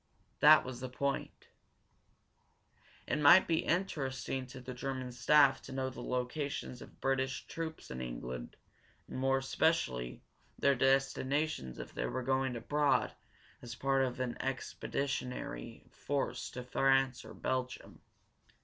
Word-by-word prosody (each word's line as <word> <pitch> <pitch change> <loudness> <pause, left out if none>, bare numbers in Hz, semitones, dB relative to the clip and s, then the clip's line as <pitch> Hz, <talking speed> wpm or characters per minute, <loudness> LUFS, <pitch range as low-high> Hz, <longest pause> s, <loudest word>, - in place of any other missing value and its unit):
That 155 +1 +8
was 130 -1 -6
the 130 0 -5
point. 140 +2 -3 1.6
It 150 - 0
might 150 +6 +8
be 165 -1 +2
interesting 135 -7 -1
to 130 +1 -9
the 125 0 -7
German 130 0 -4
staff 140 +2 +5
to - - -10
know 130 0 -2
the 125 - -8
locations 125 +1 -3
of - - -13
British 135 0 0
troops 160 -1 -6
in 65 - -5
England, 60 0 -6 0.5
and, - - -6
more 135 0 +3
especially, 135 - 0 0.3
their 140 - +4
destinations 135 - +1
if - - -8
they - - -2
were 130 - -3
going 130 0 +1
abroad 145 +5 +1 0.5
as 120 0 -7
part 135 +1 +2
of 125 -1 -2
an 125 -2 -2
expeditionary 130 - -4
force 140 -1 -2
to 125 - -6
France 135 0 +2
or - - -11
Belgium. 130 0 -3
130 Hz, 130 wpm, -33 LUFS, 125-140 Hz, 1.6 s, That